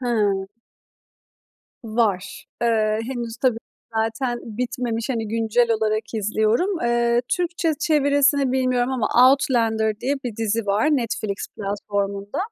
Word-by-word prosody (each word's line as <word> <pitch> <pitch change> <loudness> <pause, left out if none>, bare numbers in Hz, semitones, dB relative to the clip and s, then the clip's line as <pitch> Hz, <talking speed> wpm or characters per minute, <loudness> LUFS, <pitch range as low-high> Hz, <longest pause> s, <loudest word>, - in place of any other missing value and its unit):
Hıı. 210 -6 0 1.4
Var. 215 -4 -1 0.2
Eee, 215 -2 +2
henüz, 235 -2 -5
tabii, 250 -4 +2 0.4
zaten 225 +3 -1
bitmemiş, 235 0 -3
hani, 225 -4 -2
güncel 230 +2 +1
olarak 215 -1 +1
izliyorum. 220 - +1
Eee, 240 0 +2 0.2
Türkçe 340 -2 0
çevirisini 285 -3 +3
bilmiyorum 255 -1 +1
ama 245 -4 0 0.2
Outlander 225 -5 +1
diye 270 +3 0
bir 230 -4 -4
dizi 225 0 -1
var 205 +6 +2
Netflix 220 -5 -3
platformunda. 200 0 -3
230 Hz, 110 wpm, -22 LUFS, 215-250 Hz, 1.4 s, çevirisini